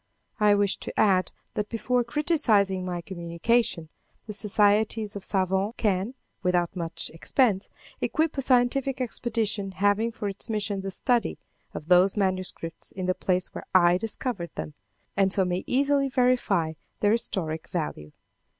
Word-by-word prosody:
I 210 -1 +5
wish 200 -1 +1
to - - -6
add 190 -3 +3 0.2
that 210 0 -2
before 245 +2 0
criticising 235 - +2
my 175 -1 -3
communication, 170 +1 -1 0.4
the 210 - -6
societies 210 +1 +2
of 200 - -6
savans 190 +3 0
can, 205 +3 0 0.3
without 180 -1 +1
much 165 -2 -3
expense, 200 - +1 0.3
equip 315 0 0
a 275 - -1
scientific 260 +1 +2
expedition 220 -5 -1
having 205 +4 +2
for 210 -2 -5
its 200 +2 -5
mission 205 -2 -1
the 195 - -4
study 240 +5 0 0.4
of 150 - -6
those 180 +3 +5
manuscripts 185 -4 -2
in 185 -1 -5
the 185 - +2
place 185 0 -1
where - - -8
I 175 -1 +6
discovered 220 -4 -3
them, 150 - -5 0.4
and 195 -1 +3
so 190 -1 +2
may 180 0 -1
easily 275 +1 +2
verify 245 -11 +2 0.3
their 205 - +4
historic 165 -8 -1
value. 115 - -4
200 Hz, 145 wpm, -26 LUFS, 185-230 Hz, 0.4 s, I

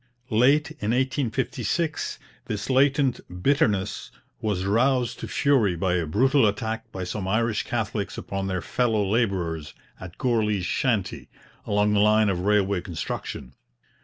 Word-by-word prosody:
Late 135 +7 +3
in 105 - -4
1856 130 - -1 0.3
this 105 +5 -3
latent 135 0 +3 0.2
bitterness 105 -8 +1 0.3
was 100 -4 -1
roused 120 +3 +1
to - - -5
fury 125 -11 +2
by 90 +1 0
a 85 -3 0
brutal 130 - +3
attack 110 +2 -3
by 95 - -5
some 95 +1 -4
Irish 110 +2 +1
Catholics 105 -4 -3
upon 95 0 -4
their 95 -2 -2
fellow 110 -5 +1
labourers 90 -8 -1 0.2
at 90 -2 -10
Gourley's 105 -6 +1
Shanty, 105 -2 -1 0.4
along 105 0 +2
the 105 - +3
line 105 0 +4
of 90 -3 -1
railway 100 -1 +2
construction. 80 -7 -5
105 Hz, 135 wpm, -25 LUFS, 95-125 Hz, 0.4 s, line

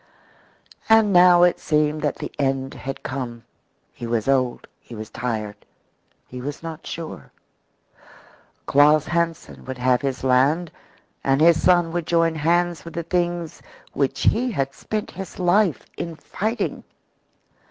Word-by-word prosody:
And 220 -2 +5
now 175 0 +7
it 175 - +3
seemed 150 0 +1
that 150 - 0
the - - -6
end 135 -1 -1
had 135 0 -7
come; 120 -3 -5 0.5
he 120 - -7
was 115 -1 -1
old, 130 -3 +1
he 120 - -12
was 110 0 -8
tired, 110 -4 -4 0.7
he 125 0 -9
was 145 +4 -6
not 165 -1 -7
sure. 165 -1 -7 1.3
Claus 150 +2 +5
Hansen 170 -1 -2
would 130 0 -6
have 125 -1 +2
his 135 -2 -3
land 140 +6 +2 0.5
and 135 0 +2
his 165 +1 +5
son 175 -2 +3
would 170 -1 -3
join 165 -1 +2
hands 170 +2 0
with 165 -1 -10
the 170 - -2
things 175 -1 -2 0.3
which 140 -2 -1
he 250 +3 +2
had 135 - -2
spent 215 +7 -4
his 190 0 -8
life 180 -1 +2
in 170 -1 -5
fighting. 220 +8 -3
155 Hz, 140 wpm, -22 LUFS, 135-175 Hz, 1.3 s, now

